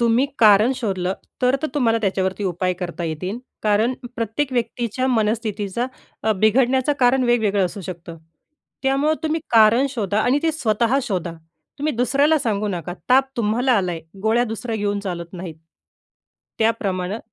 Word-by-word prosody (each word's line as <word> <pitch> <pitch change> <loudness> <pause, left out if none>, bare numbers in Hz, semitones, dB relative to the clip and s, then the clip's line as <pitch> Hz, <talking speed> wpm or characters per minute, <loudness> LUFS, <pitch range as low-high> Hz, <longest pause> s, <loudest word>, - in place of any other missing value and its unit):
तुम्ही 235 +3 +3
कारण 215 +3 +6
शोधलं 190 -6 -1 0.3
तर-तर 265 +4 +2
तुम्हाला 230 -5 +2
त्याच्यावरती 190 0 -1
उपाय 180 0 0
करता 175 -1 -5
येतील. 180 +7 -4 0.2
कारण 215 +3 +2 0.2
प्रत्येक 230 +5 -2
व्यक्तीच्या 240 +1 -1
मनस्थितीचा 220 -1 -1 0.4
अ, 220 - +2
बिघडण्याचं 250 +7 +2
कारण 255 +1 +4
वेगवेगळं 215 -5 +2
असू 190 +3 -8
शकतं. 170 -2 -8 0.6
त्यामुळं 275 +3 +2
तुम्ही 320 +1 0
कारण 230 +4 +5
शोधा 210 -5 -1
आणि 250 +5 +2
ते 325 - +2
स्वतः 235 -2 +1
शोधा, 180 -7 -3 0.5
तुम्ही 300 +2 -1
दुसऱ्याला 280 +6 +3
सांगू 215 -6 -1
नका. 175 -2 -4 0.2
ताप 265 +2 +4
तुम्हाला 235 +4 +1
आलाय, 180 -6 0 0.2
गोळ्या 225 +2 +3
दुसऱ्या 225 0 -4
घेऊन 205 -1 -1
चालत 175 -3 -5
नाहीत, 175 -3 -7 1.0
त्याप्रमाणं 205 -3 0
220 Hz, 140 wpm, -21 LUFS, 195-250 Hz, 1.0 s, कारण